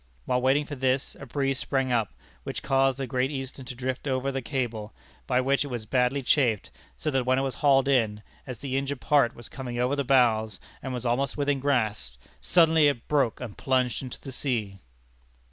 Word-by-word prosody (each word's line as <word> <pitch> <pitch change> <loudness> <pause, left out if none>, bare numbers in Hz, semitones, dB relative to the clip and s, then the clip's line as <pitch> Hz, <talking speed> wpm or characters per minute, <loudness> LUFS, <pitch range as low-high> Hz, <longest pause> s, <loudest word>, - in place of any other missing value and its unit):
While 125 0 +1
waiting 135 +3 +3
for 145 - -7
this 130 0 0
a 140 - -9
breeze 135 +1 -1
sprang 135 -2 0
up, 115 -4 0 0.3
which - - -5
caused 135 -1 +2
the 135 - -2
Great 130 0 0
Eastern 135 -2 -6
to 125 0 -7
drift 130 +3 -3
over 130 0 0
the 135 0 -3
cable, 120 -6 -3 0.3
by 125 0 +2
which 135 +2 +2
it - - -6
was 120 -5 -5
badly 125 +3 +1
chafed, 120 -6 +2 0.2
so 155 - -2
that 135 -2 +1
when 130 +1 +2
it 135 - +1
was 135 -1 -2
hauled 135 -2 +4
in, 110 -6 +2 0.2
as 125 -2 -5
the 135 +2 -3
injured 135 0 -2
part 140 -3 +3
was 120 - -9
coming 125 -3 -6
over 125 +3 +1
the 140 - 0
bows 115 -6 +3 0.2
and 130 - -5
was 125 -1 -4
almost 125 +4 0
within 145 -1 +1
grasp, 110 - 0 0.2
suddenly 160 -3 +5
it 140 -5 -1
broke 135 -7 +1
and 120 -5 -8
plunged 130 -3 +1
into 130 -2 -7
the 135 - -8
sea! 115 -7 -2
130 Hz, 205 wpm, -27 LUFS, 120-140 Hz, 0.3 s, suddenly